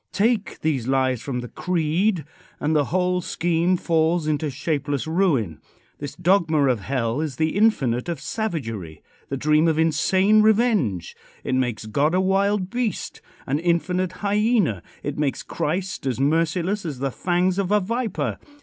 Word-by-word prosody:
Take 215 0 0
these 140 -7 0
lies 130 -2 +1
from 125 -3 -3
the 120 - -7
creed 175 - 0 0.3
and 155 +2 0
the 145 -2 +3
whole 180 +2 0
scheme 175 +1 +1
falls 165 0 +1
into 155 0 0
shapeless 145 0 -2
ruin. 160 - 0 0.4
This 145 -1 -6
dogma 170 -5 +2
of 125 -4 +1
hell 120 +3 -1
is 155 -4 -3
the 160 +4 0
infinite 145 - +2
of 170 -5 -3
savagery 115 - -4 0.3
the 135 - -2
dream 155 +4 +3
of 160 -1 +2
insane 185 +6 +3
revenge. 215 - +2 0.3
It - - -2
makes 125 -4 -1
God 145 +10 +1
a - - +3
wild 195 0 +1
beast 240 -3 -3 0.2
an 140 +3 0
infinite 175 +2 0
hyena. 205 - +2 0.2
It 145 0 -4
makes 145 -3 -1
Christ 180 -2 -3
as 125 -2 -1
merciless 165 +7 +1
as 155 -6 -4
the 135 +1 -2
fangs 180 +5 0
of 190 -2 0
a 210 - +5
viper. 225 +1 -2
160 Hz, 155 wpm, -23 LUFS, 135-185 Hz, 0.4 s, a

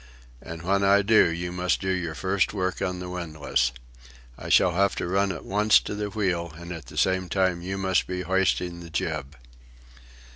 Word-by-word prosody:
"And 80 +1 -8
when 100 +2 +1
I 100 +1 +5
do, 110 -4 +5
you 85 +1 -4
must 90 0 0
do 95 -1 -1
your 85 -4 -2
first 95 +4 0
work 95 -1 -2
on 90 -2 -1
the 90 0 -6
windlass. 75 -8 -1 0.6
I - - -8
shall 90 - +5
have 100 +3 +1
to - - -3
run 95 +2 +1
at 90 - -7
once 105 +2 +4
to - - -5
the 105 0 -3
wheel, 90 -5 -1
and 85 +1 -9
at 85 -2 -8
the - - -11
same 95 -1 +1
time 95 -2 +1
you 95 +2 -4
must 95 -1 +1
be 90 0 -3
hoisting 90 -1 0
the 85 -1 -10
jib." 75 -2 -3
90 Hz, 195 wpm, -26 LUFS, 85-95 Hz, 0.6 s, I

